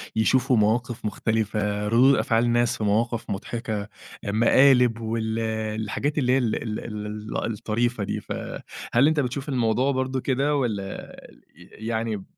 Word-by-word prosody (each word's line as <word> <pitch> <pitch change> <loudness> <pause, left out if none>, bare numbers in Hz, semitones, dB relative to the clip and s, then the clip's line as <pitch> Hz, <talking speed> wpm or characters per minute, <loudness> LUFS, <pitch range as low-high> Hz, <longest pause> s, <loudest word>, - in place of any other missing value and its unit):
يشوفوا 125 +3 +3
مواقف 115 +3 0
مختلفة، 105 -1 -1
ردود 125 +5 +5
أفعال 115 -1 +2
ناس 120 0 +2
في - - -4
مواقف 115 +3 0
مضحكة، 110 +1 -3
آآ، 100 - -8 0.4
مقالب، 125 +1 +5
وال 110 0 -2 0.4
الحاجات 140 +8 -2
اللي 125 -4 +2
هي - - +4
ال 120 -5 0
ال 110 -2 -3 0.7
ال - - -2
الطريفة 110 +2 -1
دي. - - -2
فهل 125 +5 -1
أنت 155 -1 +2
بتشوف 135 +1 -2
الموضوع 125 +1 +1
برضه 130 0 -1
كده، 140 +3 +1
والّا 105 -8 -3 0.4
ي 110 - -13
يعني، 110 -3 -2
115 Hz, 140 wpm, -25 LUFS, 110-130 Hz, 0.7 s, ردود